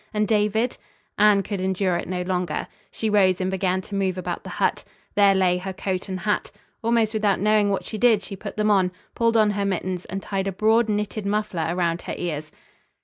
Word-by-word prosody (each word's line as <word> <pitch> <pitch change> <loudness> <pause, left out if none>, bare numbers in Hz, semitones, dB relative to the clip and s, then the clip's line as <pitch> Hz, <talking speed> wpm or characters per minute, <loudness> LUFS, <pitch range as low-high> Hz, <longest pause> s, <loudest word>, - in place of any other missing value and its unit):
And 210 0 +2
David? 220 +2 +1 0.4
Anne 210 -1 +5
could 200 -1 -4
endure 185 -1 0
it - - -3
no 180 0 -2
longer. 180 -3 -2 0.2
She 220 - -3
rose 190 -4 +3
and 185 0 -1
began 190 -1 0
to 200 - -12
move 190 -2 0
about 185 - -4
the - - -8
hut. - - +1 0.3
There 200 -1 +5
lay 180 -1 +2
her 190 +1 -5
coat 185 +1 -3
and 185 -1 -4
hat. 210 +2 0 0.3
Almost 230 -1 +2
without 210 -3 +1
knowing 210 0 +3
what 195 - -1
she 215 - -5
did 220 -4 +4
she 195 - -7
put 200 +1 -8
them 210 0 +2
on, 190 -3 +3 0.2
pulled 230 -1 +2
on 215 -1 +4
her 205 0 -1
mittens 185 -2 -2
and 195 - -4
tied 195 0 -3
a - - 0
broad, 220 +4 +2
knitted 210 0 -2
muffler 205 -6 -1
around 170 -1 0
her - - -5
ears. 155 -3 -4
195 Hz, 210 wpm, -24 LUFS, 185-210 Hz, 0.4 s, Anne